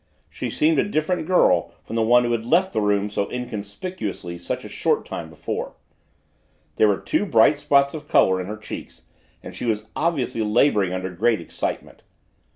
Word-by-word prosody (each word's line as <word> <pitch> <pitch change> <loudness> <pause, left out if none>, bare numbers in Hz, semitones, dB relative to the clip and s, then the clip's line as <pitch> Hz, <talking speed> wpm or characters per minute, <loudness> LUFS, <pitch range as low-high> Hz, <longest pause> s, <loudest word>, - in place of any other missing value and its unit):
She - - -4
seemed 155 -1 +2
a - - +4
different 160 -1 -1
girl 90 - +3
from 115 - -7
the 115 - +2
one 120 +2 +5
who 120 - -1
had 115 -1 0
left 175 +10 +2
the 110 - +1
room 105 0 +1
so 100 -1 -2
inconspicuously 105 - -5
such 85 - -4
a - - -6
short - - 0
time - - -6
before. - - -5 1.0
There 110 - +5
were 100 -2 +2
two - - -1
bright 145 - +4
spots 140 -1 +3
of 150 -2 -8
color 95 -8 +3
in 90 - -6
her 105 +1 -5
cheeks 110 - -9 0.4
and - - -9
she - - -5
was 110 -2 -1
obviously 150 -8 -1
laboring 105 -3 +2
under 95 0 -3
great 110 +5 +1
excitement. 85 - -5
115 Hz, 180 wpm, -23 LUFS, 100-145 Hz, 1.0 s, one